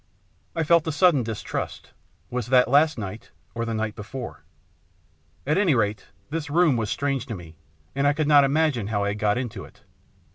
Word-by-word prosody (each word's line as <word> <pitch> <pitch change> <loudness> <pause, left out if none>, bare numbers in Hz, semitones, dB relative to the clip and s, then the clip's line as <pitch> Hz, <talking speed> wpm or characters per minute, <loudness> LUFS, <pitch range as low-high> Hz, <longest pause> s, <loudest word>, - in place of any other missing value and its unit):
I 165 - 0
felt 165 0 +3
a - - +1
sudden 150 -2 +4
distrust. 110 -2 -5 0.4
Was 125 -3 -3
that 125 -1 +5
last 145 +4 +4
night, 100 -5 -7 0.2
or 115 0 -3
the 115 - -3
night 110 0 -2
before? 120 +4 -8 1.0
At 155 - +2
anyrate, 115 - +1 0.2
this 160 -1 -3
room 165 -2 +3
was 110 -3 -1
strange 140 -1 -1
to 115 - -4
me, 85 -3 -11 0.4
and 140 +1 +1
I 145 - +4
could 155 0 -1
not 145 -2 +7
imagine 140 -6 +1
how 105 -2 -1
I 100 - 0
had 105 +1 -4
got 105 0 +1
into 125 -3 -4
it. - - -16
130 Hz, 185 wpm, -24 LUFS, 110-150 Hz, 1.0 s, not